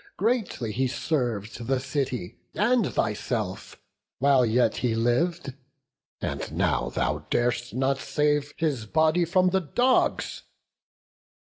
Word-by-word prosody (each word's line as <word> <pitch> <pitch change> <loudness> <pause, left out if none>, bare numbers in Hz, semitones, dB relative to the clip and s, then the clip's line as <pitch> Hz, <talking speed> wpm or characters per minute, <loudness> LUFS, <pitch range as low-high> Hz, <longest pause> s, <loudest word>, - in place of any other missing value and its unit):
Greatly 205 - 0
he 130 +4 0
serv'd 120 -5 -2
the 135 0 +1
city 130 -7 -3 0.2
and 230 0 +2
thyself, - - -2 0.4
While 135 -1 +4
yet 120 +3 +2
he 120 -3 0
liv'd; 135 +7 0 0.7
and - - -4
now 60 0 0
thou - - -2
dar'st 120 0 0
not 135 +1 +1
save 150 0 0
His 140 -9 -1
body 160 +5 +3
from 185 +1 +3
the 190 0 +2
dogs! 245 - +1
135 Hz, 115 wpm, -26 LUFS, 120-170 Hz, 0.7 s, While